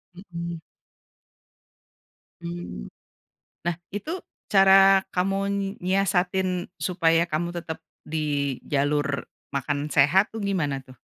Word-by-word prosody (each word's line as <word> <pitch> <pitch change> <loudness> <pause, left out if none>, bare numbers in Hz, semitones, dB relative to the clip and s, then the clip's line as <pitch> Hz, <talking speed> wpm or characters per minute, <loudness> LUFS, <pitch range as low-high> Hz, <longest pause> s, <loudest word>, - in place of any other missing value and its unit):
Mhm. 170 -3 -6 1.8
Mmm, 170 - -6 0.8
nah 175 -1 +1
itu 305 - -4 0.3
cara 195 0 +7
kamu 195 +2 +1 0.4
nyiasatin 185 -1 +1
supaya 170 -2 +2
kamu 170 +3 -1
tetap 160 -1 -5 0.3
di 145 -4 -1
jalur 145 0 0 0.3
makan 145 +2 -1
sehat 155 +10 +4
tuh 220 - -4
gimana 155 -9 -1
tuh? 130 -1 -16
170 Hz, 90 wpm, -25 LUFS, 145-190 Hz, 1.8 s, cara